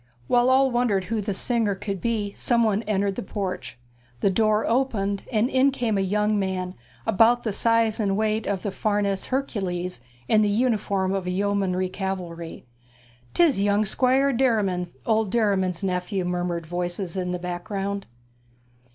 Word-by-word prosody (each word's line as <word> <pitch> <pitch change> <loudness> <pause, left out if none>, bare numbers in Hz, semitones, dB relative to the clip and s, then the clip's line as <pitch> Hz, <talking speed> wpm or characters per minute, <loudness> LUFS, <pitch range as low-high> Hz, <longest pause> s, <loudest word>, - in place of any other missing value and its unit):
While 245 - +3
all 265 0 +4
wondered 240 -6 +1
who 215 +3 -2
the 205 - -3
singer 220 0 0
could 195 -2 -5
be 215 -4 -1
somebody 225 -4 +1
entered 200 -1 +1
the - - -4
porch; 185 - -5 0.4
the 195 - +2
door 215 +1 +2
opened, 225 -6 0
and 220 0 +2
in 265 +1 +3
came 245 -5 -1
a 195 - +1
young 210 +2 +1
man, 185 -2 -2 0.3
about 230 +3 +4
the 215 - -1
size 230 0 +2
and 200 -2 +1
weight 215 0 0
of 195 -2 -2
the 205 - -2
Farnese 200 -1 0
Hercules, 185 - -2 0.3
in 215 - +4
the 210 - +3
uniform 205 -4 +1
of 195 -2 -2
the 180 - -1
yeomanry 190 -1 0
cavalry. 180 -5 -5 0.7
''Tis 310 - +4
young 205 +1 +2
Squire 265 +5 +2
Derriman, 210 -8 +1 0.2
old 220 -1 +2
Mr. 190 - -8
Derriman's 195 -5 +1
nephew,' 185 0 -1
murmured 175 -1 -2
voices 175 +2 -3
in 180 -1 -2
the 180 - -1
background. 195 +3 -4
200 Hz, 160 wpm, -24 LUFS, 185-225 Hz, 0.7 s, all